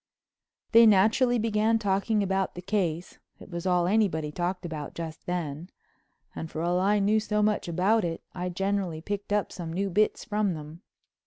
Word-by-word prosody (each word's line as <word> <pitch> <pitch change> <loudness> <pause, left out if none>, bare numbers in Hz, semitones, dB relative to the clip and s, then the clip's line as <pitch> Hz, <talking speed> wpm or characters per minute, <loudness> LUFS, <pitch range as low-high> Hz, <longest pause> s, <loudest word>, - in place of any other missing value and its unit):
They 230 -1 +8
naturally 225 +5 +4
began 220 0 +2
talking 205 0 +1
about 190 0 -1
"the 180 - -6
case"—it 180 -2 -4
was 170 +1 -4
all 180 -1 +3
anybody 180 -7 +1
talked 180 +3 -3
about 155 -4 -6
just 160 -2 -7
then—and 165 -1 -7
for 160 - -4
all 175 +1 +1
I 200 +3 +3
knew 205 +2 +3
so 210 0 0
much 210 -3 +1
about 190 +6 +2
it, 165 -1 -3
I 180 0 -3
generally 190 -3 -2
picked 205 +3 -5
up 205 -1 0
some 170 -3 -6
new 195 +3 -2
bits 210 +4 +1
from 210 -4 0
them. 155 +2 -10
190 Hz, 165 wpm, -27 LUFS, 170-210 Hz, -, They